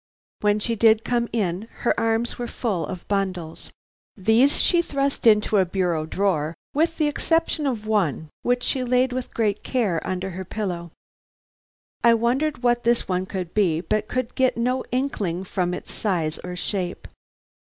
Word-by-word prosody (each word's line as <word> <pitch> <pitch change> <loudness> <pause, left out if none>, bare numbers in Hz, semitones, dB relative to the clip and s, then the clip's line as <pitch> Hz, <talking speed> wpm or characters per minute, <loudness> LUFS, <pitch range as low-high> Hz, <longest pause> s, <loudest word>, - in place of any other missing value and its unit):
When 210 0 +2
she 230 +2 -1
did 220 0 +5
come 240 -1 +1
in, 205 -2 -1
her - - +3
arms 225 +2 0
were 240 - -2
full 200 - -2
of 180 - -7
bundles. 185 -5 -2 0.5
These 225 +8 +4
she 345 -1 +4
thrust 280 -5 -1
into 210 -1 +5
a 190 - +5
bureau 175 -4 -1
drawer, 165 -4 0 0.2
with 325 +3 +1
the 305 - +2
exception 320 0 0
of 225 -5 -2
one, 180 -8 0
which 245 0 +1
she 260 - 0
laid 250 +1 +2
with 255 0 -4
great 210 -3 0
care 210 -11 0
under 185 0 -3
her 185 +2 -5
pillow. 175 -3 -4 1.1
I 235 -1 +7
wondered 255 +4 0
what 240 0 +2
this 235 0 +2
one 185 0 -1
could 185 -3 -5
be, 180 -7 +2
but 215 +4 -1
could 255 -1 -2
get 260 -2 +2
no 250 +2 0
inkling 210 -9 -1
from 180 -1 -1
its 180 - -6
size 165 -7 -1
or 180 0 -5
shape. 180 -1 -3
215 Hz, 165 wpm, -24 LUFS, 180-245 Hz, 1.1 s, I